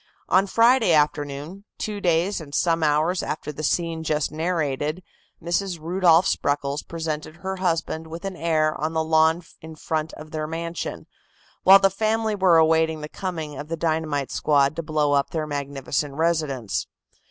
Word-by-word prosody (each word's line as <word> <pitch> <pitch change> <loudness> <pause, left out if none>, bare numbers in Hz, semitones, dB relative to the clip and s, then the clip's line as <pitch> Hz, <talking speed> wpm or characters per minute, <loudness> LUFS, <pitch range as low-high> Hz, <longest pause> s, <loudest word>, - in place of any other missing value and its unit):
On 190 +3 +4
Friday 230 -2 +4
afternoon, 150 +4 -1
two 210 -1 -4
days 175 +2 +1
and 145 -2 -8
some 165 +1 +2
hours 155 +4 +2
after 150 - -4
the 150 - -7
scene 165 +1 -1
just 150 -2 0
narrated, 155 0 -2 0.4
Mrs. 175 +1 -2
Rudolph 170 +1 +3
Spreckels 145 0 0
presented 155 -2 -5
her 190 +2 -5
husband 165 -3 -1
with 165 +3 -8
an 195 -1 -4
heir 160 -2 +1
on 155 +1 -1
the 160 0 +1
lawn 160 +2 +3 0.2
in 160 0 -10
front 155 0 -3
of 155 0 -11
their 155 -1 -3
mansion, 170 +1 -5 0.6
while 195 +1 +9
the 195 0 +3
family 220 +2 0
were 190 -4 +4
awaiting 160 0 +3
the 150 - -6
coming 160 -6 -5
of 145 - -6
the 165 +1 -4
dynamite 155 -4 -1
squad 145 -1 +2
to - - -1
blow 150 -2 0
up 140 -1 +2
their 160 -2 -2
magnificent 140 -1 -3
residence. 155 -8 -1
160 Hz, 165 wpm, -24 LUFS, 150-175 Hz, 0.6 s, while